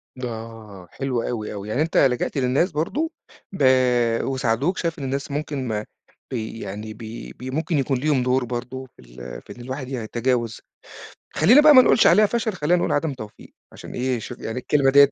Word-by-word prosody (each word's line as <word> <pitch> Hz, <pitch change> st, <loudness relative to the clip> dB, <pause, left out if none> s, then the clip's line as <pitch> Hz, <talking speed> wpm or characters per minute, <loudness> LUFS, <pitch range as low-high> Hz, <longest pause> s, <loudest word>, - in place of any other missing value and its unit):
د 130 Hz, -, -10 dB
آه، 110 Hz, -5 st, -8 dB
حلو 130 Hz, -3 st, -2 dB
أوي، 110 Hz, -3 st, -4 dB
أوي. 100 Hz, +1 st, -7 dB
يعني 130 Hz, +8 st, 0 dB
أنت 165 Hz, -, 0 dB
لجأت 130 Hz, +1 st, +2 dB
للناس 135 Hz, +8 st, +2 dB
برضه، 280 Hz, -, -1 dB, 0.4 s
ب 190 Hz, -, -2 dB, 0.6 s
وساعدوك. 135 Hz, -, 0 dB
شايف 165 Hz, -1 st, -2 dB
إن 140 Hz, -, -5 dB
الناس 140 Hz, +1 st, -3 dB
ممكن 145 Hz, -3 st, -3 dB
ما 105 Hz, -1 st, -2 dB, 0.5 s
بي 115 Hz, -2 st, -4 dB
يعني 105 Hz, +3 st, -6 dB
ب -, -, -17 dB, 0.4 s
ب 130 Hz, +1 st, -6 dB
ممكن 160 Hz, +1 st, 0 dB
يكون 135 Hz, -1 st, +1 dB
ليهم 135 Hz, -1 st, +1 dB
دُور 125 Hz, 0 st, +1 dB
برضه 125 Hz, +2 st, -5 dB
في -, -, -17 dB
ال -, -, -10 dB
في -, -, -11 dB
إن 120 Hz, -, -12 dB
الواحد 130 Hz, +1 st, -6 dB
يتجاوز، 120 Hz, -1 st, -2 dB, 0.7 s
خلّينا 225 Hz, -, +6 dB
بقى 300 Hz, 0 st, +8 dB
ما 255 Hz, -, +10 dB
نقولش 240 Hz, -, +4 dB
عليها 215 Hz, 0 st, +6 dB
فشَل، 230 Hz, 0 st, -1 dB
خلّينا 175 Hz, 0 st, +1 dB
نقول -, -, 0 dB
عدم 145 Hz, 0 st, 0 dB
توفيق 110 Hz, -5 st, -11 dB, 0.2 s
عشان -, -, -11 dB
إيه، 125 Hz, 0 st, -1 dB
شوف 120 Hz, +2 st, -8 dB
يعني 110 Hz, +2 st, -4 dB
الكلمة 135 Hz, +1 st, +2 dB
دِيّة 140 Hz, 0 st, +7 dB
130 Hz, 190 wpm, -23 LUFS, 115-150 Hz, 0.7 s, ما